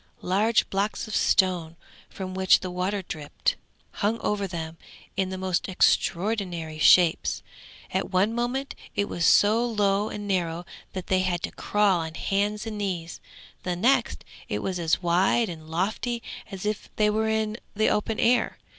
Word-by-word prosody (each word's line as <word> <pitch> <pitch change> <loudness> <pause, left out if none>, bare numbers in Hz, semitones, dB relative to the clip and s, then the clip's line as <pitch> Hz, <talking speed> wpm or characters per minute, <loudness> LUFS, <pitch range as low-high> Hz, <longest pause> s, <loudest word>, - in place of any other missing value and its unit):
Large 210 +5 +2
blocks 200 +3 -1
of 215 - -4
stone, 175 -4 +2 0.3
from 185 -1 -6
which 190 0 +4
the 185 - -4
water 185 +2 -2
dripped, 150 -4 -2 0.4
hung 220 +3 -1
over 200 -1 -1
them 165 -2 -6 0.4
in 190 -1 0
the 190 - -4
most 185 -1 -1
extraordinary 180 -4 +1
shapes; 170 +1 +4 0.5
at - - -1
one 195 +4 +2
moment 245 +4 -2 0.2
it 205 - +1
was 170 - 0
so 215 +3 +5
low 210 -3 +1
and 205 0 -6
narrow 175 -3 -1 0.3
that 185 -1 -5
they 185 - +2
had 180 -2 -1
to - - -2
crawl 205 -3 +2
on 160 0 -5
hands 205 +4 -1
and 215 -2 -5
knees, 175 -5 -4 0.4
the 180 -1 -2
next 240 +10 +1 0.2
it - - -2
was 185 -2 -2
as 165 +2 +1
wide 185 +6 +3
and 160 -2 -9
lofty 215 +7 -2 0.3
as 195 -1 -7
if 210 0 -2
they 210 -1 +3
were 220 +1 0
in 220 0 0 0.2
the 215 +1 +3
open 215 +1 -1
air. 245 +1 +2
195 Hz, 165 wpm, -26 LUFS, 175-210 Hz, 0.5 s, so